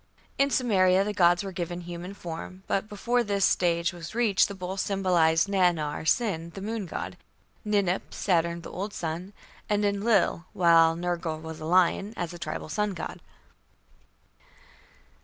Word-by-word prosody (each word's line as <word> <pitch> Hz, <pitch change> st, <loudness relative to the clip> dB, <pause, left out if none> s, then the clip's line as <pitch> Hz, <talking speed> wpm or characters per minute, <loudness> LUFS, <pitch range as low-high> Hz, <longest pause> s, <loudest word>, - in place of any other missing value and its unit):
In 275 Hz, 0 st, +4 dB
Sumeria 195 Hz, -7 st, +3 dB
the 210 Hz, -, -2 dB
gods 175 Hz, -1 st, +4 dB
were 195 Hz, -, -5 dB
given 175 Hz, -1 st, -4 dB
human 175 Hz, +2 st, -7 dB
form, 180 Hz, +2 st, -8 dB
but 195 Hz, +2 st, -1 dB
before 240 Hz, +4 st, 0 dB
this 200 Hz, -3 st, +1 dB
stage 170 Hz, 0 st, +1 dB
was 175 Hz, +4 st, -9 dB
reached 225 Hz, -5 st, +3 dB
the 200 Hz, -, -7 dB
bull 185 Hz, 0 st, -5 dB
symbolized 180 Hz, -4 st, +2 dB
Nannar 175 Hz, -6 st, +1 dB
(Sin), 170 Hz, -6 st, +1 dB
the 195 Hz, -, -6 dB
moon 215 Hz, -1 st, -3 dB
god, -, -, -5 dB, 0.5 s
Ninip 200 Hz, -4 st, +1 dB
(Saturn, 170 Hz, -2 st, 0 dB
the -, -, -9 dB
old 200 Hz, +3 st, -5 dB
sun), 170 Hz, +4 st, -4 dB, 0.4 s
and 210 Hz, 0 st, +2 dB
Enlil, 200 Hz, -3 st, +2 dB
while 165 Hz, -2 st, +5 dB
Nergal 170 Hz, -2 st, -2 dB
was 160 Hz, -1 st, -8 dB
a 155 Hz, -, -6 dB
lion, 185 Hz, +5 st, +2 dB
as 175 Hz, -1 st, -3 dB
a 175 Hz, -, -9 dB
tribal 170 Hz, -, -5 dB
sun 210 Hz, +4 st, -1 dB
god. 170 Hz, -, -6 dB
185 Hz, 155 wpm, -27 LUFS, 170-200 Hz, 0.5 s, while